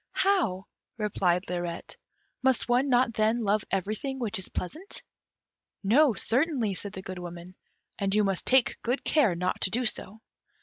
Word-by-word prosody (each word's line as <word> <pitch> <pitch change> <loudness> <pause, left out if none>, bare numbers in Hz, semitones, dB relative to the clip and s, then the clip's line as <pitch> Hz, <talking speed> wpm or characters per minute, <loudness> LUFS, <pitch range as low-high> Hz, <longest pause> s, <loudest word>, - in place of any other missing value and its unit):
"How?" 280 - +1 0.3
replied 190 -4 0
Lirette. 175 -1 -4 0.5
"Must 260 -1 +2
one 250 +3 +2
not 245 -2 +3
then 220 +2 +1
love 205 0 +1
everything 215 +8 -2
which 230 -7 -1
is 190 - -3
pleasant?" 315 - -6 0.8
"No, 245 +5 +4
certainly," 250 - +1
said 200 +2 -3
the 190 - -7
Good 185 -1 -6
Woman, 175 0 -8 0.5
"and 195 0 0
you 210 - +4
must 195 -3 -2
take 260 -2 +3
good 245 +3 -1
care 255 - +3
not 180 +2 -2
to - - +3
do 245 +5 0
so." 215 -1 -2
215 Hz, 160 wpm, -28 LUFS, 190-250 Hz, 0.8 s, No